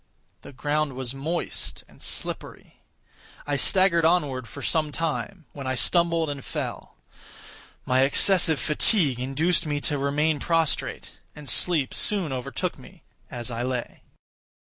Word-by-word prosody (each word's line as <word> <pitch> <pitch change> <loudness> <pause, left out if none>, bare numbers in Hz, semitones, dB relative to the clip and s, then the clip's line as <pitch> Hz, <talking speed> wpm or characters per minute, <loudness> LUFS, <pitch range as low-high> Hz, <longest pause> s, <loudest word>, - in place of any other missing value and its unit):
The - - -11
ground 145 +1 -1
was 130 -1 -4
moist 155 +6 -4
and - - -20
slippery. - - -4 0.6
I 145 - -1
staggered 170 +4 +3
onward 145 -7 +1
for - - -9
some 155 -2 +1
time, 165 +3 -3
when 140 -2 -7
I 130 - -1
stumbled 170 +3 +2
and 140 -2 -5
fell. - - -6 0.9
My 130 0 +2
excessive 160 +3 +4
fatigue 150 - +2
induced 150 +7 +1
me 145 -1 -1
to 145 -1 -1
remain 145 +2 +1
prostrate; 165 -1 -1 0.2
and 150 -1 -11
sleep 150 +2 +3
soon 190 -9 0
overtook 125 -1 -3
me - - -16 0.3
as 120 0 -5
I 115 0 -3
lay. 125 -1 -4
150 Hz, 135 wpm, -25 LUFS, 130-165 Hz, 0.9 s, excessive